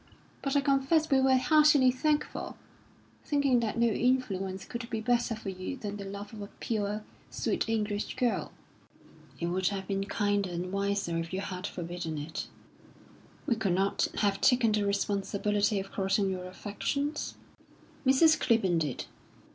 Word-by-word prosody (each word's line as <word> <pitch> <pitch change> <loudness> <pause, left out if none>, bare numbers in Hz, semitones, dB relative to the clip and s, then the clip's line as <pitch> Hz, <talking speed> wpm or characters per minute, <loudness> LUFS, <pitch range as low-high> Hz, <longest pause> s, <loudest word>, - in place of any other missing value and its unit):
But 275 0 -1
I 285 - +5
confess 280 +3 +2
we 270 -1 +5
were 265 0 +5
heartily 290 0 +5
thankful, 300 +4 -1 0.7
thinking 280 -4 +2
that 230 -1 -2
no 235 - +4
influence 210 -6 0
could 235 -1 -6
be 225 -3 -2
better 240 0 +1
for 215 -2 -6
you 185 +8 -5
than 205 -3 -5
the 200 - -6
love 200 +2 -7
of 215 - -8
a 200 - -5
pure, 210 -1 -2 0.3
sweet - - -1
English 210 -2 -1
girl." 245 -2 0 0.9
"It 170 - -1
would 180 +2 0
have 195 -2 -2
been 195 0 -1
kinder 205 -1 0
and 175 +1 -4
wiser 200 -4 0
if 165 0 -4
you 190 +1 -2
had 185 -1 -4
forbidden 170 -2 -5
it." 150 +2 -5 1.0
"We 240 - +2
could 200 -5 0
not 195 +1 +1
have 200 -2 +1
taken 245 -4 +4
the 210 -1 +1
responsibility 200 +1 0
of 195 0 -7
crossing 195 0 +1
your 180 -1 -4
affections." 280 +10 -3 0.7
"Mrs. 275 +5 +5
Clibborn 190 -7 +3
did." 150 -5 -2
205 Hz, 155 wpm, -30 LUFS, 195-250 Hz, 1.0 s, I